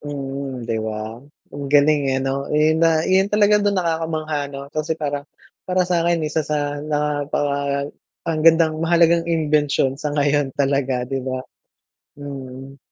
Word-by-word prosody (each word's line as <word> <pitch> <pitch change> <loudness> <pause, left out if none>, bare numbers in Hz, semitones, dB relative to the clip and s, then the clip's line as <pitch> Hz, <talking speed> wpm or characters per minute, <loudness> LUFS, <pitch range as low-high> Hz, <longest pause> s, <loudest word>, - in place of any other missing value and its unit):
Mm, 135 -3 -5
'di 115 -1 -2
ba? 110 +1 -5 0.3
Ang 140 -1 -5
galing, 145 +1 +4
eh, 130 - +1
ano 135 +1 -2
yun 155 +2 +2
na 165 -1 +3
yun 190 +1 +3
talaga 210 0 +4
dun 205 -1 +1
nakakamangha 160 -4 -1
ano 140 -1 -7
kasi 155 +1 -2
parang 145 -1 -4 0.4
para 185 0 +2
sa'in 170 -2 +1
sa 160 - +1
sa 150 0 -1 0.2
napaka 145 -1 -1 0.3
ang 160 -2 -1
gandang 160 -1 +4
mahalagang 170 0 +3
imbensyon 150 -4 +1
sa 150 -1 -2
ngayon 145 -1 +2
talaga, 135 -3 0
'di 135 +1 -3
ba? 130 0 -4 0.8
Mm. 135 -1 -8
145 Hz, 145 wpm, -21 LUFS, 140-160 Hz, 0.8 s, galing